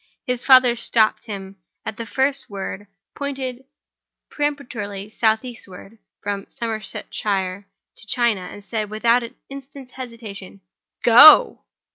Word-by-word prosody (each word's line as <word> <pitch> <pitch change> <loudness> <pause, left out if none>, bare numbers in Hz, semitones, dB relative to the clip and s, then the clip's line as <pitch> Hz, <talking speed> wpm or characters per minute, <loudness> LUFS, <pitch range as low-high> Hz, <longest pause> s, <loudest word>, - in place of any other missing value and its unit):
His 250 -2 -3
father 255 -3 +6
stopped 230 -1 0
him 195 -2 -8 0.3
at 220 - -5
the 230 - -6
first 270 +4 -1
word, 200 0 -7 0.3
pointed 265 -2 -5 0.7
peremptorily 235 -9 -4
southeastward 220 -2 -3 0.2
(from 200 0 -4
Somersetshire 205 -3 -4 0.3
to - - -11
China); 230 -3 +1
and 205 -1 -12
said, 215 -2 -3
without 230 +3 +2
an 235 -1 -9 0.2
instant's 275 -1 -11
hesitation: 225 -7 -10 0.4
"Go!" 310 - +8
225 Hz, 110 wpm, -21 LUFS, 205-255 Hz, 0.7 s, Go